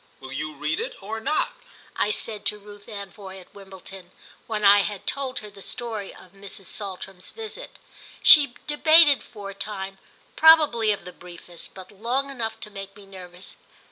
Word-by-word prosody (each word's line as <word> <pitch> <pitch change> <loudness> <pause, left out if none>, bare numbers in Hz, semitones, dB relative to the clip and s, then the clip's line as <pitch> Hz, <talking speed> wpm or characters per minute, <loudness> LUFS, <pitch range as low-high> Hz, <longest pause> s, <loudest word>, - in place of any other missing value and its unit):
"Will 130 -1 -10
you 155 +2 -4
read 150 +1 -1
it - - -4
or 220 +3 -4
not?" 305 +7 +1 0.4
I - - +1
said 210 0 -2
to 210 - +1
Ruth 205 0 -14
Anvoy, 200 -2 -8
at 180 - -17
Wimbledon, 190 -2 -12 0.4
when 215 -2 -1
I 200 +1 +8
had 200 0 -3
told 270 -2 -2
her 210 - -9
the 195 - -14
story 220 -2 -5
of 185 - -16
Mrs. 195 0 -8
Saltram's 190 -1 -6
visit. 450 +2 -9 0.5
She 285 -6 +8
debated 300 -1 +6
for 205 -4 -9
a - - -10
time 195 -1 -5 0.4
probably 300 -9 +6
of 205 - -4
the 180 - -9
briefest, 175 -1 -11
but 190 0 -11
long 245 +7 -2
enough 230 -4 -4
to 210 - -8
make 195 -1 -9
me 205 -2 -14
nervous. 185 -1 -11
205 Hz, 170 wpm, -25 LUFS, 190-230 Hz, 0.5 s, I